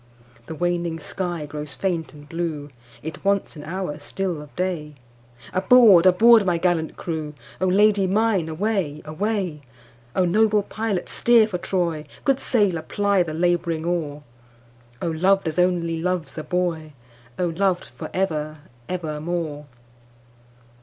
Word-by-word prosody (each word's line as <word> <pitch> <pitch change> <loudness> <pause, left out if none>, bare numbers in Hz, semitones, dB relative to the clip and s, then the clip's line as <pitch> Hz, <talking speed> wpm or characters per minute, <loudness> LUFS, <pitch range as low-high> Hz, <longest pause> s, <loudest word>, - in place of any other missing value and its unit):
The 160 - -6
waning 175 0 -1
sky 175 -1 -4
grows 150 -2 -6
faint 170 0 -2
and 145 -1 -14
blue, 155 -3 -4 0.3
It 160 +1 -7
wants 200 -2 0
an 150 - -9
hour 175 -3 -4
still 175 +2 -3
of 150 -1 -14
day, 170 -5 -3 0.6
Aboard! 195 -2 +7
aboard! 220 +4 +7
my 180 -3 +1
gallant 165 -2 0
crew,O 155 +2 -5
Lady 200 +1 +4
mine 200 -4 +1
away! 170 -3 -2
away!O 150 - -3
noble 210 +3 +3
pilot 210 -4 -3
steer 230 -2 +4
for 180 -5 -4
Troy, 170 -4 -1 0.2
Good 275 -1 +3
sailor 200 -9 +1
ply 200 +3 +1
the 160 -3 -2
labouring 170 -1 0
oar,O 120 -7 -6
loved 185 +3 +2
as 160 +2 -2
only 170 -2 +1
loves 180 -2 -2
a 155 - -5
boy!O 150 -7 -4
loved 180 +1 0
for 120 +1 -9
ever 155 -5 -2 0.3
evermore! 155 -3 -3
170 Hz, 125 wpm, -23 LUFS, 150-190 Hz, 0.6 s, Aboard